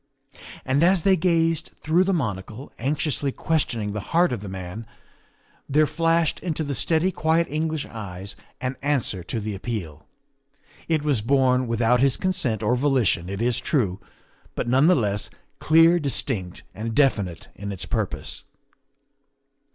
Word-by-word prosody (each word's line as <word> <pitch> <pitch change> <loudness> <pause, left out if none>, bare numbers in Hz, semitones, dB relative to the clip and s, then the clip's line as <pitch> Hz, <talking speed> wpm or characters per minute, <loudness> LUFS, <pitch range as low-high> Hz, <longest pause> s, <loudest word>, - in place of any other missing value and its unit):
And 135 +3 +1
as 175 0 +4
they 195 -1 +5
gazed 165 -2 +1
through 170 +4 +2
the 195 - +1
monocle, 115 - -3
anxiously 140 +1 -1
questioning 120 -10 -1
the 105 - -3
heart 170 -2 +3
of 120 - -3
the 100 - -7
man, 95 +4 -7 0.8
there 150 +2 +4
flashed 165 +1 +1
into 160 -3 -2
the 145 -1 -3
steady, 165 +6 +1
quiet 160 0 +1
English 155 0 -1
eyes 100 -3 -7 0.2
an 130 +1 -3
answer 135 -10 0
to 110 - -3
the 110 0 -4
appeal. 95 -8 -6 0.8
It 160 -3 +1
was 140 -7 +1
born 130 +1 +2
without 115 +1 +2
his 135 0 +3
consent 155 - 0
or 120 +4 +2
volition, 125 -10 +1
it 100 +3 -3
is 125 0 +1
true, 110 - 0 0.6
but - - -2
none 130 +5 +4
the 180 - +6
less 105 -5 -1 0.3
clear, 165 +2 +5
distinct, 120 - -2
and 110 +2 -4
definite 100 - +1
in 100 0 -6
its 95 - -5
purpose. - - -3
130 Hz, 150 wpm, -24 LUFS, 105-160 Hz, 0.8 s, the